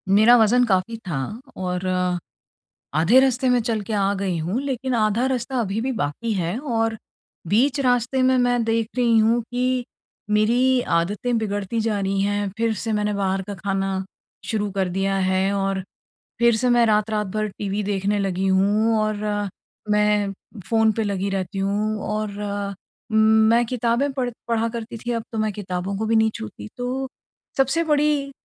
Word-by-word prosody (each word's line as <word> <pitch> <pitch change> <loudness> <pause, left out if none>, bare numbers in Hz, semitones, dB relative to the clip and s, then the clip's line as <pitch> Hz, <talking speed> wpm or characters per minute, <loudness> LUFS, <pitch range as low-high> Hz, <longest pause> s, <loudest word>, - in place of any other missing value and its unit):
मेरा 220 +4 +7
वज़न 235 +2 +4
काफ़ी 195 +2 0
था 160 -6 -2 0.4
और 180 0 -3 1.1
आधे 180 +11 +5
रास्ते 260 -1 +2
मैं 250 -1 +3
चल 225 -2 -1
के - - -2
आ 200 -1 +2
गई 190 -3 -1
हूँ 180 +10 -1
लेकिन 265 -2 -2
आधा 220 +2 +2
रास्ता 260 0 -2
अभी 210 -1 -1
भी 260 +3 -1
बाकी 220 - -2
है, 180 +2 -1
और 225 -5 -1 0.5
बीच 260 - +2
रास्ते 250 0 +1
में 260 0 +4
मैं 245 -1 +2
देख 225 -1 0
रही 235 -2 +3
हूँ 225 +2 +3
कि 250 0 0 0.5
मेरी 240 +5 +3 0.2
आदतें 205 +8 -1
बिगड़ती 205 +1 -2
जा 220 -2 0
रही 195 0 0
हैं 205 0 0
फिर 230 0 +1
से 220 +2 -3
मैंने 210 0 0
बाहर 195 -1 0
का 205 - -5
खाना 195 -1 -2 0.4
शुरू 210 -2 -1
कर 190 -1 0
दिया 195 +2 0
है 190 +1 +1
और 195 -1 -1 0.6
फिर 235 -1 +5
से 250 +3 +1
मैं 240 -1 +5
रात-रात 215 0 +1
भर 215 0 0
टीवी 205 +1 -2
देखने 200 +1 0
लगी 195 -1 -1
हूँ 205 +4 +3
और 215 0 0 0.7
मैं 210 -1 +2 0.4
फ़ोन 225 -1 +3
पे 225 - -1
लगी 200 -1 -1
रहती 195 0 -3
हूँ 210 +2 0 0.2
और 210 -1 -3 0.7
मैं 220 +2 +5
किताबें 245 +3 0
पढ़ 255 -2 -2 0.2
पढ़ा 230 0 +1
करती 230 0 -6
थी 240 +2 -3
अब 230 -1 -2
तो 225 - -3
मैं 215 -1 0
किताबों 190 -1 -4
को 220 - -1
भी 225 +1 +2
नहीं 220 0 +4
छूती 105 -1 -8
तो 255 +2 -3 0.5
सबसे 270 +5 +2
बड़ी 295 -2 +1
220 Hz, 170 wpm, -22 LUFS, 200-240 Hz, 1.1 s, मेरा